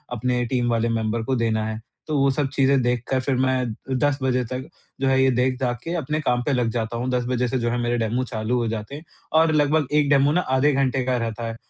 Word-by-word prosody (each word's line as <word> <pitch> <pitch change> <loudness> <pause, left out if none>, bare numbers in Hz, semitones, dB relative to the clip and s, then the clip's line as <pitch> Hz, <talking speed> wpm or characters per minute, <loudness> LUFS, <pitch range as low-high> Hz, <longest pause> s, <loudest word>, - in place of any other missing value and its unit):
अपने 125 +1 0
टीम 120 0 0
वाले 115 0 +1
मेंबर 115 0 -1
को 130 +2 -1
देना 110 -2 0
है। 110 0 -4 0.3
तो 155 -2 0
वो 135 0 +3
सब 140 +1 0
चीज़ें 135 -1 +3
देखकर 125 +2 0
फिर 130 0 0
मैं 130 -3 0 0.2
10 145 +1 +1
बजे 125 -1 +1
तक 130 +3 -5 0.3
जो 135 - +2
है 130 0 +3
ये 135 - +4
देख-दाख 125 -1 0
के 170 - -4
अपने 155 -1 -2
काम 125 -4 +1
पे 145 - 0
लग 125 -3 +1
जाता 115 0 -3
हूँ, 125 +2 -2
10 125 -1 0
बजे 125 0 0
से 130 - -1
जो 120 0 0
है 120 - -1
मेरे 120 0 0
डेमो 115 +2 0
चालू 115 0 -2
हो 120 -1 0
जाते 110 +4 -5
हैं 150 - -9 0.4
और 160 0 +4
लगभग 150 -1 +2
एक 150 -1 +3
डेमो 145 0 +4
ना 180 - +2 0.2
आधे 145 +3 +4
घंटे 135 -1 +1
का 130 -1 +1
रहता 115 0 -3
है, 115 - -5
125 Hz, 250 wpm, -23 LUFS, 115-135 Hz, 0.4 s, ये